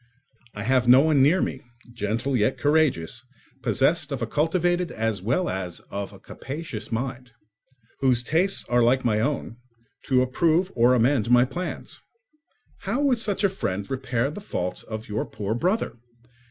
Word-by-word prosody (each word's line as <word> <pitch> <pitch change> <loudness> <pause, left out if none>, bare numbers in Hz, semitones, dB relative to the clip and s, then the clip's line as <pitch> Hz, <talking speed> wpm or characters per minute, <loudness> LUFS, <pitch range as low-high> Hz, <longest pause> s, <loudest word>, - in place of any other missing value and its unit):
I 105 - -5
have 125 +1 +2
no 125 +2 +8
one 155 -2 +3
near 155 +8 +4
me, 130 - -4 0.3
gentle 115 +5 -1
yet 115 +2 +1
courageous, 140 - +1 0.4
possessed 135 +6 +1
of 135 - -2
a - - +1
cultivated 175 +6 0
as 110 -3 -2
well 130 - 0
as 90 -2 -4
of 100 0 -4
a - - -13
capacious 135 -6 -7
mind, 125 +1 -4 0.7
whose 125 -3 +2
tastes 175 +9 0
are 120 0 +3
like 125 +2 +3
my 110 -3 +2
own, 120 -2 -2 0.5
to 130 -1 +3
approve 165 +8 +1
or 120 +2 +4
amend 120 -1 +2
my 125 0 +6
plans. 175 +8 -6 0.8
How 265 - -2
would 265 -5 +2
such 205 -2 -1
a - - +6
friend 100 - -3
repair 130 0 -1
the 205 - -8
faults 90 - -3
of 110 0 -7
your 105 +1 -2
poor 105 +1 -4
brother! 185 - 0
130 Hz, 160 wpm, -25 LUFS, 115-155 Hz, 0.8 s, no